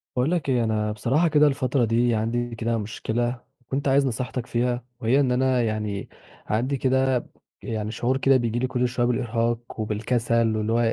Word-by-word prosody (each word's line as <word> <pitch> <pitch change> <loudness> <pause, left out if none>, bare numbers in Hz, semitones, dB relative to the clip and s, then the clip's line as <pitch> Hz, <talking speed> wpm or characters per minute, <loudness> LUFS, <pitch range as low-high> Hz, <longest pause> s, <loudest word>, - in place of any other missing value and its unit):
باقول 125 +6 +1
لك 170 -6 -1
إيه، 125 -2 +2
أنا 110 -1 0
بصراحة 130 +10 +1
كده 150 -1 +5
الفترة 135 -2 +1
دي 115 +1 +2
عندي 115 +2 -1
كده 115 0 -1
مشكلة، 120 +3 -2 0.3
كنت 140 +1 -1
عايز 140 +1 +4
نصيحتك 125 -1 -3
فيها، 120 0 -1 0.2
وهي 120 +5 +2
إن 135 -3 +2
أنا 130 0 +2
يعني 105 -3 -2 0.4
عندي 125 +6 0
كده 130 -1 +1 0.4
يعني 110 -1 -3
شعور 125 +3 0
كده 135 0 +4
بييجي 120 -1 -1
لي 130 - 0
كُلّ 125 0 0
شوية 120 0 0
بالإرهاق 120 -1 -1
وبالكَسَل 115 +1 0
واللي 110 +1 -1
هو 115 - +2
120 Hz, 175 wpm, -24 LUFS, 115-130 Hz, 0.4 s, كده